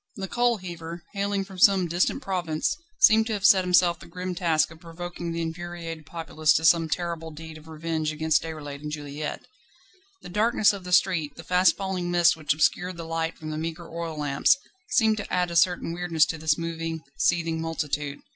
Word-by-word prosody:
The 195 -4 -5
coal 240 +2 +1
heaver, 170 -2 -8
hailing 200 0 -1
from 190 -1 -11
some 190 -2 +5
distant 175 - 0
province, 180 - -1 0.3
seemed 220 - +6
to 225 - -2
have 200 -2 -2
set 190 -2 +7
himself 180 -2 +3
the - - -13
grim 180 0 -5
task 165 -3 +1
of 160 - -13
provoking 175 0 -6
the 165 0 -2
infuriated 165 -1 -6
populace 155 -2 +1
to 160 - +1
some 165 -1 +4
terrible 170 -1 -3
deed 160 +1 -10
of 155 0 -13
revenge 160 -1 -2
against 155 0 +1
Déroulède 145 -3 -7
and 150 0 -5
Juliette. 150 0 -5 0.8
The - - -9
darkness 210 +2 +3
of 195 -2 -8
the 180 - -6
street, 175 -5 +2
the 165 - -10
fast 180 +2 +3
falling 190 -3 -3
mist 175 -1 +4
which 155 -3 -2
obscured 175 +4 +1
the 165 - -6
light 165 0 -2
from 155 -1 -7
the 155 - -3
meagre 165 +1 -6
oil 165 -2 -4
lamps, 145 - +3 0.3
seemed 220 -3 +3
to 205 - -6
add 180 -1 +1
a - - -5
certain 170 0 +2
weirdness 170 -3 +2
to 160 - -5
this 155 -1 +2
moving, 165 -1 -4 0.2
seething 165 -1 +1
multitude. 150 -3 -3
165 Hz, 195 wpm, -26 LUFS, 160-180 Hz, 0.8 s, set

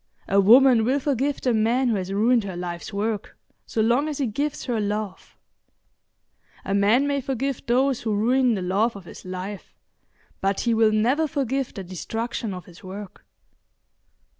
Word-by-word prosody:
A 200 +1 +4
woman 240 +3 +6
will 260 +5 +1
forgive 280 0 -1
the 250 - +1
man 235 +4 +2
who 225 - +1
has 190 -1 -3
ruined 225 +4 +3
her 190 -3 -6
life's 175 +1 -5
work 210 +1 -3 0.3
so 220 - -1
long 245 +7 +2
as 295 - -4
he 280 - 0
gives 285 +6 -3
her 240 -4 -1
love; 210 -1 -4 1.3
a 195 - -2
man 210 +7 +3
may 285 -1 0
forgive 270 0 -3
those 255 +1 +2
who 220 -2 -1
ruin 245 +3 +2
the 190 - -3
love 205 +6 +1
of 195 -3 -10
his - - -12
life, 185 +2 -7 0.7
but 195 0 0
he 235 - +1
will 220 -1 +4
never 250 +9 +2
forgive 275 -3 -2
the 195 - -5
destruction 225 +5 -4
of 180 -1 -7
his 175 -1 -16
work. 195 +1 -9
225 Hz, 170 wpm, -24 LUFS, 200-260 Hz, 1.3 s, woman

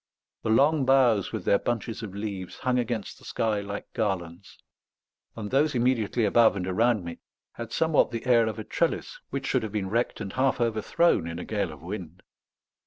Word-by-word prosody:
The - - -3
long 145 +6 +4
boughs 125 -6 +3
with - - -5
their 100 - +4
bunches 115 -1 -3
of 100 -4 -7
leaves 100 -3 -5
hung 125 -1 0
against 115 -3 -3
the - - -20
sky 110 -2 -1
like 100 0 -7
garlands; 95 -4 -3 0.8
and 105 -2 -6
those 145 +1 +2
immediately 120 -2 +1
above 110 +2 +5
and 95 -2 -3
around 105 +1 +1
me 85 - -7 0.3
had 115 -1 -8
somewhat 160 -2 +3
the 115 0 -5
air 120 -3 +4
of 110 - -3
a 110 - -5
trellis 170 - -2
which - - -4
should - - +1
have 110 - -5
been 100 -3 -3
wrecked 120 +2 0
and 95 - -5
half 130 0 +1
overthrown 115 - +2
in 85 0 -5
a 90 - -6
gale 100 -5 -2
of 75 -1 -12
wind. 90 -2 -7
110 Hz, 190 wpm, -27 LUFS, 100-120 Hz, 0.8 s, above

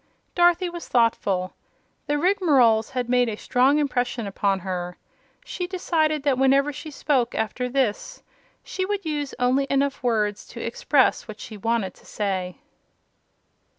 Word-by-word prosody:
Dorothy 350 +1 +3
was 345 -1 -7
thoughtful. 200 -6 +1 0.5
The 295 - +1
Rigmaroles 285 - +3
had 250 -2 -3
made 245 -1 +2
a 215 - -3
strong 260 +6 +2
impression 245 -5 -1
upon 195 -1 -1
her. 180 -1 -4 0.5
She 360 -7 -4
decided 315 -5 0
that 275 -3 +1
whenever 275 +2 +3
she 295 +2 -8
spoke, 270 -4 0
after 235 +3 -2
this, 265 - -2 0.4
she 375 - -4
would 400 0 -3
use 295 -3 -3
only 255 +3 +1
enough 275 0 0
words 215 -5 0
to 235 - -10
express 255 +4 +1
what 215 -1 -9
she 220 - -8
wanted 210 -2 -1
to - - -22
say. 185 -4 -3
255 Hz, 145 wpm, -24 LUFS, 220-295 Hz, 0.5 s, Dorothy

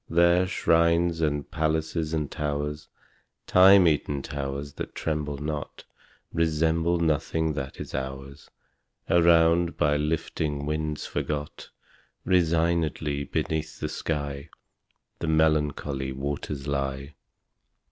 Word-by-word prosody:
There 85 +2 +4
shrines 85 -1 +2
and 75 -2 -1
palaces 80 0 -1
and 75 -3 -2
towers 75 0 -3 0.6
(Time 95 0 +7
eaten 70 -2 0
towers 70 0 -5
that - - -7
tremble 75 -2 -2
not!) 75 0 -5 0.5
Resemble 80 +1 +1
nothing 80 0 0
that 70 -2 -5
is - - -7
ours. 70 +2 -6 0.6
Around, 85 0 +4
by 75 0 +2
lifting 75 -1 -2
winds 75 0 -2
forgot, 75 -1 -4 0.6
Resignedly 80 -4 +1
beneath 80 +3 -3
the - - -3
sky 70 -1 -4 0.7
The 85 - -3
melancholy 75 -3 +1
waters 70 +1 -4
lie. 70 0 -3
75 Hz, 100 wpm, -26 LUFS, 70-80 Hz, 0.7 s, Time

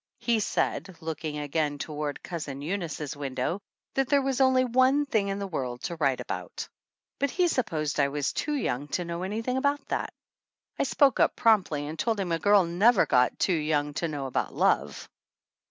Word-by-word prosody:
He 235 -2 +1
said, 190 -3 -1
looking 155 -1 -4
again 145 0 -1
toward 150 0 -4
Cousin 145 -5 -5
Eunice's 160 -5 -3
window, 140 +5 -2 0.3
that 270 -1 0
there 280 -1 +4
was 270 -1 0
only 260 -1 +4
one 260 +4 +3
thing 220 -7 +1
in 195 0 -2
the 200 - -3
world 125 -9 -4
to 170 - -3
write 140 -4 +1
about! - - -5 0.5
But 280 - +1
he 360 +5 +2
supposed 155 - -1
I 140 - +4
was 145 +1 -2
too 300 0 -1
young 145 - -2
to 180 - -4
know 170 +1 -4
anything 225 +7 -2
about 285 +1 0
that. - - -2 0.7
I - - +2
spoke 275 -5 +3
up - - +3
promptly 190 -10 +2
and 155 +2 -7
told 225 +3 0
him 185 -3 -2
a 165 - +1
girl 200 +1 +5
never 195 +6 +4
got 125 0 +3
too 190 - +2
young 150 -2 0
to 170 - 0
know 145 -3 -4
about 130 - -2
love. - - +1
170 Hz, 185 wpm, -27 LUFS, 150-235 Hz, 0.7 s, girl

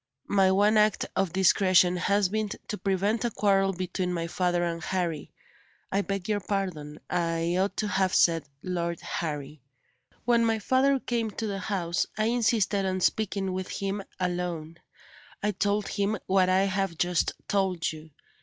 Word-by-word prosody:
My 195 -2 +3
one 205 +3 +4
act 210 -1 +3
of 190 -3 +1
discretion 185 -1 +4
has 200 +2 +2
been 215 +2 -2 0.2
to - - -2
prevent 200 +4 0
a 240 - +1
quarrel 195 -3 +2
between 180 0 -3
my 170 -2 -2
father 175 0 0
and 170 -1 -2
Harry. 170 -5 -2 0.6
I 195 - +2
beg 195 -2 -4
your 210 -1 +1
pardon, 180 -7 -3
I 165 0 0
ought 195 +2 0
to 215 - 0
have 190 -2 +1
said 165 -3 +4 0.2
Lord 170 -2 -2
Harry. 150 -2 -4 0.6
When 235 -1 +4
my 225 -1 +2
father 260 +5 +2
came 235 -3 -1
to 220 +2 -5
the 200 -2 -3
house, 180 -3 -1
I 215 - +1
insisted 220 -4 +1
on 185 -1 -1
speaking 195 -2 0
with 185 0 -4
him 200 +1 -2 0.2
alone. 175 -3 -3 0.7
I 210 - +2
told 205 +1 0
him 205 +2 0
what 185 -1 +3
I 190 +1 +4
have 195 -3 -1
just 175 0 +1
told 190 -4 0
you. 155 0 -11
190 Hz, 165 wpm, -27 LUFS, 175-205 Hz, 0.7 s, one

